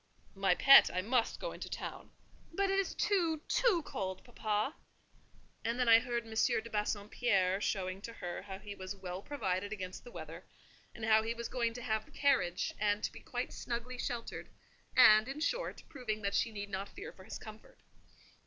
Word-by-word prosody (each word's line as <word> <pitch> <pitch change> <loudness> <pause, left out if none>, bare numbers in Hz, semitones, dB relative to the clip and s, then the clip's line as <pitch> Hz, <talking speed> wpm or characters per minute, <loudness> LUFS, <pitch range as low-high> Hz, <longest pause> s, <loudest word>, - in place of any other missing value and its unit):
"My 195 -2 +2
pet, 275 +7 +9
I 185 +1 -1
must 235 +2 +1
go - - -3
into - - -7
town." - - -6 0.4
"But 390 +3 +1
it 390 - +3
is 390 - -1
too—too 360 +2 +2
cold, 190 -1 -4
papa." 220 +1 -1 0.9
And 230 +1 -1
then 250 - +2
I 225 0 +9
heard 235 0 -2
M. 225 - -9
de 230 +1 +1
Bassompierre 205 -2 +1
showing 185 -2 -2
to 230 +2 -7
her 175 -5 -5
how 190 -1 -7
he 205 +1 -8
was 190 0 -6
well 185 -1 -6
provided 200 -7 -2
against 185 -3 -6
the 245 - -11
weather; - - -8 0.5
and 230 - -5
how 220 0 +5
he 225 +1 -2
was 235 0 -5
going 235 -2 -1
to 245 - -6
have 220 -2 -1
the - - -20
carriage, 260 -11 +1
and 205 0 +1
to - - -1
be - - -11
quite - - -4
snugly 245 +1 -4
sheltered; 235 -2 -4 0.5
and, 215 +2 +8
in 275 +3 -5
short, - - -2
proving 220 -6 -4
that 200 0 0
she 230 - +1
need 205 -1 -6
not 195 +1 -3
fear - - -9
for 190 - -14
his 205 - -7
comfort. 215 0 -12
220 Hz, 190 wpm, -34 LUFS, 200-245 Hz, 0.9 s, pet